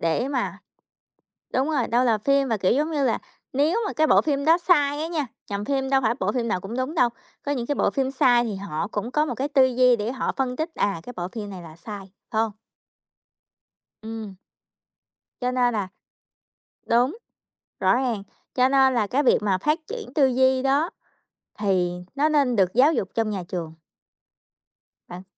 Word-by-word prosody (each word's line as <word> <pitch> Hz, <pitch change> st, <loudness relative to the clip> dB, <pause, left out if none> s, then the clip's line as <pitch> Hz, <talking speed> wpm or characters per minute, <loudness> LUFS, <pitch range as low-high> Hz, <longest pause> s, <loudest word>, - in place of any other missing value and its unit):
để 165 Hz, +10 st, 0 dB
mà 270 Hz, -3 st, -2 dB, 1.0 s
đúng 265 Hz, +4 st, +1 dB
rồi, 280 Hz, -6 st, 0 dB
đâu 240 Hz, +2 st, +2 dB
là 230 Hz, -3 st, +3 dB
phim 275 Hz, +4 st, +2 dB
mà, 225 Hz, -, +1 dB
kiểu, 185 Hz, -1 st, +2 dB
giống 300 Hz, +6 st, +1 dB
như 295 Hz, -3 st, 0 dB
là 240 Hz, -, +1 dB, 0.4 s
nếu 300 Hz, -, +2 dB
mà -, -, -4 dB
cái 315 Hz, 0 st, +2 dB
bộ -, -, +5 dB
phim 280 Hz, -1 st, -1 dB
đó 330 Hz, +2 st, +6 dB
sai 295 Hz, -5 st, +2 dB
á 320 Hz, -, -2 dB
nha, 320 Hz, -4 st, -2 dB, 0.2 s
nhằm 200 Hz, 0 st, -3 dB
phim 270 Hz, 0 st, -1 dB
đâu 270 Hz, 0 st, +3 dB
phải 225 Hz, -2 st, +2 dB
bộ -, -, 0 dB
phim 240 Hz, -2 st, -1 dB
nào 185 Hz, -, 0 dB
cũng 205 Hz, +4 st, -6 dB
đúng 260 Hz, +6 st, -2 dB
đâu, 245 Hz, -5 st, +4 dB, 0.4 s
có 285 Hz, -, -1 dB
những 250 Hz, -4 st, -2 dB
cái 290 Hz, -, 0 dB
bộ -, -, +2 dB
phim 270 Hz, -1 st, -1 dB
sai 245 Hz, -3 st, +4 dB
thì 220 Hz, -4 st, -3 dB
họ 195 Hz, -2 st, -4 dB
cũng 220 Hz, +3 st, -4 dB
có 300 Hz, +2 st, +2 dB
một 250 Hz, -6 st, -3 dB
cái 275 Hz, +4 st, -1 dB
tư 275 Hz, -2 st, +4 dB
duy 250 Hz, -1 st, +4 dB
để 220 Hz, +2 st, -3 dB
họ 260 Hz, -, -2 dB
phân 255 Hz, -2 st, -1 dB
tích: 315 Hz, +5 st, -2 dB
"À, 200 Hz, -5 st, 0 dB
cái 245 Hz, -, -9 dB
bộ 175 Hz, 0 st, -3 dB
phim 210 Hz, -3 st, -6 dB
này 185 Hz, -2 st, -8 dB
là 160 Hz, -2 st, -12 dB
sai," 205 Hz, +4 st, -8 dB, 0.3 s
phải 220 Hz, -, +2 dB
hông? 225 Hz, -1 st, -1 dB, 1.5 s
Ừm. 220 Hz, -3 st, -7 dB, 1.1 s
Cho 250 Hz, 0 st, 0 dB
nên 245 Hz, -1 st, +2 dB
là 200 Hz, -3 st, -1 dB, 1.0 s
đúng, 245 Hz, -, +2 dB, 0.6 s
rõ -, -, +4 dB
ràng, 240 Hz, -6 st, -1 dB, 0.3 s
cho 255 Hz, 0 st, +4 dB
nên 265 Hz, -1 st, +4 dB
là 225 Hz, -4 st, +1 dB
cái 265 Hz, +7 st, +1 dB
việc 255 Hz, -, +4 dB
mà 195 Hz, -3 st, +1 dB
phát 300 Hz, -, 0 dB
triển 470 Hz, -2 st, -7 dB
tư 285 Hz, -4 st, +5 dB
duy 260 Hz, 0 st, +3 dB
đó, 280 Hz, +5 st, +2 dB, 0.7 s
thì, 190 Hz, -4 st, +1 dB, 0.2 s
nó 290 Hz, +2 st, +2 dB
nên 280 Hz, -6 st, +2 dB
được 185 Hz, -1 st, +2 dB
giáo 275 Hz, +6 st, +5 dB
dục 195 Hz, -11 st, -1 dB
trong 225 Hz, -1 st, 0 dB
nhà 195 Hz, -3 st, -3 dB
trường. 165 Hz, -3 st, -5 dB, 1.3 s
Bạn 180 Hz, +1 st, -9 dB
250 Hz, 205 wpm, -24 LUFS, 210-280 Hz, 1.5 s, đó